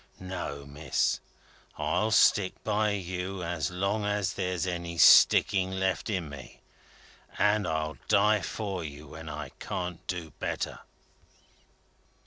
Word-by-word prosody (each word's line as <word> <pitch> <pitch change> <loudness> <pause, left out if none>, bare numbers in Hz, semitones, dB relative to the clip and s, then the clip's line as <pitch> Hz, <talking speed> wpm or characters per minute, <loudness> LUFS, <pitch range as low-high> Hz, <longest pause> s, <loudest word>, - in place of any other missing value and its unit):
No, 85 -7 -5
Miss. 75 +2 0 0.6
I'll 85 +8 0
stick 100 -2 +4
by 105 0 +1
you 95 0 -4
as 85 -3 -2
long 100 +4 -1
as 105 -1 0
there's 90 -2 -2
any 85 -2 -4
sticking 95 +2 +6
left 95 0 -1
in 90 -6 -1
me, 70 -3 -11 0.8
and 105 +1 +2
I'll 80 -1 -2
die 105 0 +4
for 100 -5 -4
you 75 -1 -9
when 80 +1 -9
I 75 - -6
can't 90 -2 -4
do 85 -3 -4
better." - - -3
90 Hz, 120 wpm, -29 LUFS, 80-100 Hz, 0.8 s, sticking